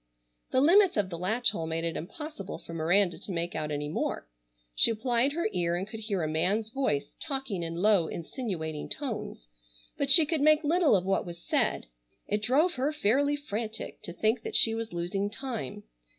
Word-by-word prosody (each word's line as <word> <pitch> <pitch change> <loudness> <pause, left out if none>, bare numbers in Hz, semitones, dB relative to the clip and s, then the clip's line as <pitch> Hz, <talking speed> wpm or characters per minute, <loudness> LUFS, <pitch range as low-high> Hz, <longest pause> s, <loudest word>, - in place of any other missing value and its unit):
The 260 - +2
limits 365 - +5
of 195 -3 0
the 170 - -4
latch 220 +6 +2
hole 165 -6 -4
made 165 +1 -2
it 165 -1 -2
impossible 255 - -6
for 165 - -11
Miranda 175 +3 +2
to - - -7
make 170 0 -2
out 155 -1 -3
any 145 0 -3
more. 150 - -3 0.5
She - - +4
applied 240 +4 +1
her 340 +2 0
ear 175 -2 0
and 185 +3 -3
could 220 +1 -7
hear 205 -5 -2
a - - 0
man's 195 +8 0
voice 255 - -1
talking 270 - -3
in 165 0 -4
low 190 -2 +3
insinuating 165 - -5
tones, 230 - -5 0.5
but 280 - 0
she 315 +3 +9
could 310 -1 -1
make 310 +1 +5
little 320 - +4
of 185 -2 +1
what 195 0 +1
was 170 0 -7
said. - - 0 0.4
It 210 +1 -1
drove 290 +11 +3
her 275 +2 0
fairly 285 +1 +2
frantic 225 -6 -5
to - - -7
think 220 +6 0
that - - -5
she 225 - +5
was 225 0 -4
losing 175 +4 -2
time. 225 - -5
210 Hz, 195 wpm, -29 LUFS, 170-270 Hz, 0.5 s, she